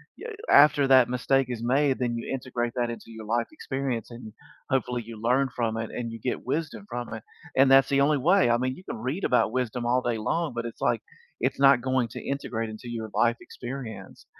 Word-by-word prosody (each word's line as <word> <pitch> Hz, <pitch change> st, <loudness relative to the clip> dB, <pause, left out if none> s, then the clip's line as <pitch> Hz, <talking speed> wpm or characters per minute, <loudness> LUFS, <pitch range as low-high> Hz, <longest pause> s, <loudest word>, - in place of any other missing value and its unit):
yeah, 480 Hz, -, -8 dB, 0.2 s
after 145 Hz, -1 st, +6 dB
that 130 Hz, -3 st, +6 dB
mistake 130 Hz, +1 st, +1 dB
is 120 Hz, -2 st, -4 dB
made, 135 Hz, +3 st, +2 dB
then 120 Hz, -2 st, -1 dB
you 115 Hz, -, -5 dB
integrate 120 Hz, -2 st, -2 dB
that 120 Hz, -1 st, 0 dB
into 115 Hz, -, -7 dB
your 110 Hz, -1 st, -9 dB
life 115 Hz, +2 st, 0 dB
experience 135 Hz, -6 st, -4 dB
and 115 Hz, -2 st, -9 dB, 0.4 s
hopefully 125 Hz, -3 st, 0 dB
you 115 Hz, -2 st, -9 dB
learn 130 Hz, +3 st, +2 dB
from 115 Hz, -2 st, -1 dB
it 115 Hz, 0 st, -4 dB
and 120 Hz, -1 st, -4 dB
you 115 Hz, -, -7 dB
get 125 Hz, -, -3 dB
wisdom 160 Hz, +8 st, -3 dB
from 120 Hz, -2 st, -5 dB
it 110 Hz, -, -6 dB, 0.4 s
and 135 Hz, 0 st, +6 dB
that's 135 Hz, 0 st, +6 dB
the 140 Hz, -, +2 dB
only 150 Hz, +1 st, +3 dB
way. 175 Hz, +2 st, +4 dB
I 120 Hz, -, +4 dB
mean, 130 Hz, +1 st, -1 dB
you 180 Hz, -, -13 dB
can -, -, -5 dB
read 130 Hz, -, -3 dB
about 125 Hz, -3 st, +2 dB
wisdom 125 Hz, -1 st, -2 dB
all 125 Hz, +1 st, +2 dB
day 120 Hz, -2 st, -1 dB
long, 150 Hz, +6 st, -1 dB
but 115 Hz, 0 st, -3 dB
it's, 115 Hz, -, -7 dB
like, -, -, +1 dB, 0.4 s
it's -, -, 0 dB
not 135 Hz, -2 st, +6 dB
going 130 Hz, -1 st, +1 dB
to -, -, -7 dB
integrate 115 Hz, -5 st, -3 dB
into 110 Hz, +3 st, -9 dB
your 115 Hz, -2 st, -5 dB
life 120 Hz, 0 st, +3 dB
experience 120 Hz, -3 st, -8 dB
125 Hz, 220 wpm, -26 LUFS, 115-135 Hz, 0.4 s, after